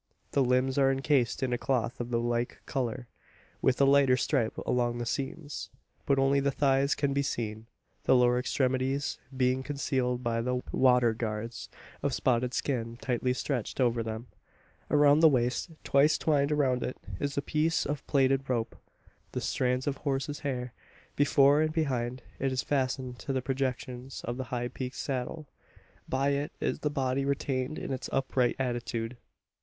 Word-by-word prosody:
The 140 - +3
limbs 130 +2 +2
are 135 -1 +5
encased 135 -2 +1
in 125 -1 0
a 120 - -1
cloth 125 -4 -1
of 120 0 -4
the 120 -1 +1
like 120 0 -1
colour, 125 -2 -3 0.5
with 130 - +2
a 140 - +6
lighter 135 -2 +5
stripe 130 -5 0
along 120 -1 +1
the 120 - -3
seams. 145 +4 -4 0.4
But 140 - +3
only 135 +1 +3
the 140 0 +1
thighs 140 0 +2
can 140 -1 0
be 140 - +2
seen 110 -5 -3 0.4
the - - +5
lower 125 0 +4
extremities 130 +1 0 0.2
being 130 0 +2
concealed 130 -3 -1
by 115 -1 0
the 125 +1 -1
"water 125 -3 +4
guards" 110 0 -4 0.3
of - - 0
spotted 125 0 +1
skin 120 -4 -2
tightly 125 0 0
stretched 125 -1 -2
over 120 -2 +2
them. 110 +1 -4 0.6
Around 145 0 +5
the 160 0 +8
waist 125 +2 0
twice 140 +3 +4
twined 145 -2 +2
around 135 -4 +2
it 125 - -3 0.2
is 140 -1 -2
a - - +2
piece 160 +2 +1
of 145 -1 -3
plaited 135 -1 +2
rope, 115 -3 -1 0.6
the - - -1
strands 125 0 0
of 140 -2 -1
horse's 140 +1 -2
hair. 125 -3 -3 0.4
Before 145 0 +5
and 155 0 +1
behind, 130 -6 -1 0.2
it 135 0 0
is 130 - -1
fastened 130 -2 -1
to 135 - -3
the 130 - 0
projections 130 -1 -3
of 120 +1 -3
the 130 - -3
high 120 0 -3
peaked 130 0 -5
saddle. 140 +3 -4 0.6
By 135 +2 +1
it 140 +1 -1
is - - -1
the 150 - 0
body 135 -1 0
retained 135 0 -1
in 135 - -4
its 130 - -5
upright 130 -2 +1
attitude. 120 -2 -2
130 Hz, 170 wpm, -29 LUFS, 125-140 Hz, 0.6 s, the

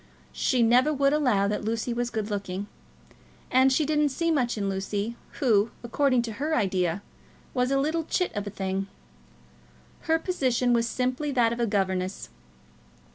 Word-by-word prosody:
She 250 -3 +2
never 250 +6 +4
would 280 -1 +2
allow 250 -10 +2
that 210 +1 -2
Lucy 225 +2 -1
was 240 0 -1
good 215 -2 -3
looking. 200 -1 -3 0.9
And 260 +1 +5
she 295 +3 +2
didn't 300 0 +2
see 335 +5 0
much 250 -7 0
in 200 -1 -1
Lucy, 200 +3 -2 0.2
who, 225 -5 +2
according 255 0 +2
to 230 - -4
her 310 +2 +1
idea, 185 - 0 0.5
was 250 -1 +1
a 275 - +2
little 315 +3 0
chit 360 -4 -1
of 205 0 -3
a - - -2
thing. 195 -1 -3 1.2
Her 320 0 +4
position 255 -8 +1
was 235 -1 +2
simply 255 +4 -1
that 235 -3 +3
of 235 - -6
a 235 - +1
governess. 190 -2 -1
240 Hz, 165 wpm, -26 LUFS, 205-275 Hz, 1.2 s, And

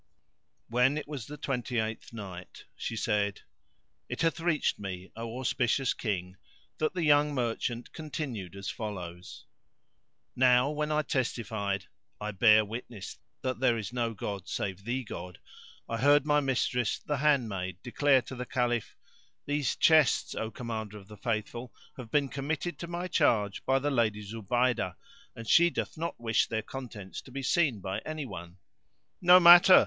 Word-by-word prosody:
When 125 +5 +3
it 155 - -4
was 140 -6 -6
the 150 - -8
Twenty 125 -3 -2
eighth 110 0 -2
Night, 95 -5 -9
She 115 - -4
said, 105 -2 0 0.7
It - - -2
hath 165 +1 +1
reached 165 -2 +1
me, 95 -2 -6
O 115 +1 -5
auspicious 130 0 +1
King, 95 -4 -3 0.4
that 155 +4 0
the 175 - 0
young 145 -1 +4
merchant 120 -1 -2
continued 135 - -5
as 100 0 -7
follows: 90 -5 -7 0.9
Now 125 +2 +5
when 150 0 -2
I 150 0 +2
testified, 110 -7 -2 0.3
"I 105 +1 -3
bear 105 +1 +6
witness 115 -1 -7 0.2
that 130 -3 -2
there 125 -3 +3
is 110 +1 -5
no 115 -2 -1
god 100 -2 -5
save 100 0 -3
the 130 +2 -1
God," 90 -5 -7 0.5
I 115 - -2
heard 145 +4 +5
my 150 -1 +4
mistress 125 -4 0
the 150 - -3
handmaid 110 - +1
declare 135 +1 +3
to - - -9
the 125 0 -5
Caliph, 120 -2 -1 0.5
"These 145 -2 0
chests, 155 -5 +4
O 110 - -3
Commander 110 -3 -5
of 100 -1 -14
the 105 - -10
Faithful, 115 +3 -3 0.2
have 125 -4 -8
been 145 +2 +2
committed 145 +5 -3
to 170 - -5
my 175 +1 -3
charge 110 - +2
by 135 - +4
the 145 +2 0
Lady 110 -5 +1
Zubaydah, 115 -1 0 0.4
and 115 -1 -8
she 170 +7 +6
doth - - -3
not 165 +2 -4
wish 115 -1 +2
their 110 -1 -2
contents 110 -7 -7
to - - -15
be 135 +1 -5
seen 140 - +2
by 95 +2 -3
any 155 +4 -5
one." 85 -6 -9 0.6
"No 180 0 +8
matter!" 175 +1 +10
120 Hz, 160 wpm, -30 LUFS, 105-145 Hz, 0.9 s, matter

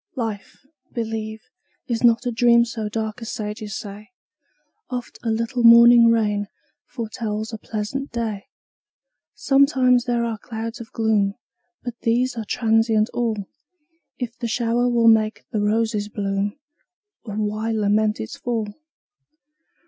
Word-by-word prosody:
Life, 225 -1 -5 0.3
believe, 220 -1 -4 0.5
is 235 -1 -2
not 235 +1 +4
a 245 - 0
dream 235 0 +4
So 225 -2 -4
dark 220 +2 -4
as 230 - -5
sages 210 -1 -5
say; 210 +1 -9 0.8
Oft 250 -1 -6
a 230 - -2
little 230 +3 -1
morning 235 0 +8
rain 210 -3 +1 0.4
Foretells 220 -2 -4
a 220 - -5
pleasant 225 +7 -4
day. 225 -1 -3 0.9
Sometimes 260 -3 +3
there 240 -2 0
are 225 -2 -3
clouds 225 +1 -6
of 225 - -11
gloom, 210 -3 +1 0.5
But 240 -1 -6
these 245 +2 +1
are 225 -2 -4
transient 225 -1 +2
all; 225 -4 -1 0.7
If 245 -2 -5
the 240 - -2
shower 240 +1 +1
will 235 -1 +3
make 220 -1 +3
the 215 - -1
roses 210 0 0
bloom, 200 +1 -2 0.7
O 210 - -5
why 215 +1 -2
lament 215 0 +1
its 110 - -5
fall? 225 -4 -3
225 Hz, 135 wpm, -22 LUFS, 215-235 Hz, 0.9 s, morning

